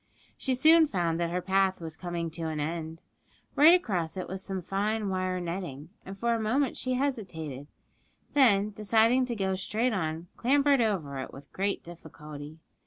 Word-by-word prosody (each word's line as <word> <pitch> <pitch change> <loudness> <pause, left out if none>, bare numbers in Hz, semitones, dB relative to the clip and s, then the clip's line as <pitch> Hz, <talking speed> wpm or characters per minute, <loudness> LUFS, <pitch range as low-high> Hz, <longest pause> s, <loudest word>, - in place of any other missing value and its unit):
She 260 -2 -1
soon 315 +4 +6
found 170 - -1
that 170 -1 0
her 180 +1 -2
path 190 0 +2
was 160 -2 -6
coming 170 -2 -4
to 165 0 -4
an 155 -1 -3
end; 160 +1 -4 0.5
right 315 +5 +8
across 190 - -2
it 185 - -4
was 190 +1 -4
some 190 -1 -3
fine 205 +3 -1
wire 185 -1 -1
netting, 170 -4 -5
and 195 +1 -9
for 235 +3 +1
a 230 - 0
moment 245 +5 +1
she 255 - -2
hesitated, 180 - -3 0.7
then, 215 -7 +4
deciding 225 +5 +3
to 240 -1 -3
go 190 -2 -1
straight 220 +6 0
on, 165 -3 -2
clambered 280 +1 +3
over 165 -12 -1
it 130 - -6
with 135 - -14
great 200 +1 -1
difficulty. 155 -3 -10
190 Hz, 175 wpm, -28 LUFS, 165-230 Hz, 0.7 s, right